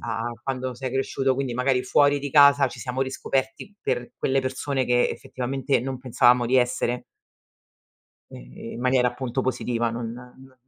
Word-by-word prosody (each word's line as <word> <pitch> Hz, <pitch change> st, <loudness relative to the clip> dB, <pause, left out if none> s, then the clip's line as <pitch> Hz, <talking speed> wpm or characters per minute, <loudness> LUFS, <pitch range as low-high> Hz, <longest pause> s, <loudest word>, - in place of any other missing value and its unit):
a 115 Hz, -1 st, -3 dB, 0.2 s
quando 130 Hz, -1 st, -3 dB
sei 130 Hz, 0 st, -5 dB
cresciuto, 135 Hz, 0 st, 0 dB
quindi 130 Hz, -2 st, -3 dB
magari 125 Hz, +1 st, +1 dB
fuori 145 Hz, +1 st, +3 dB
di 145 Hz, -, -4 dB
casa, 140 Hz, -1 st, +6 dB
ci -, -, -11 dB
siamo 130 Hz, 0 st, -2 dB
riscoperti 135 Hz, +7 st, -3 dB
per 125 Hz, 0 st, -2 dB
quelle 135 Hz, 0 st, +1 dB
persone, 130 Hz, +1 st, -2 dB
che 125 Hz, 0 st, +2 dB
effettivamente 135 Hz, +2 st, -2 dB
non 130 Hz, +1 st, -4 dB
pensavamo 125 Hz, -1 st, +3 dB
di 130 Hz, +2 st, +2 dB
essere. 125 Hz, 0 st, +1 dB, 1.3 s
Ehm, -, -, -10 dB
in 115 Hz, -, -7 dB
maniera 125 Hz, 0 st, +3 dB
appunto 125 Hz, +1 st, -3 dB
positiva, 120 Hz, -2 st, -1 dB
non 115 Hz, 0 st, -4 dB
n 125 Hz, +2 st, -13 dB
130 Hz, 155 wpm, -24 LUFS, 125-135 Hz, 1.3 s, casa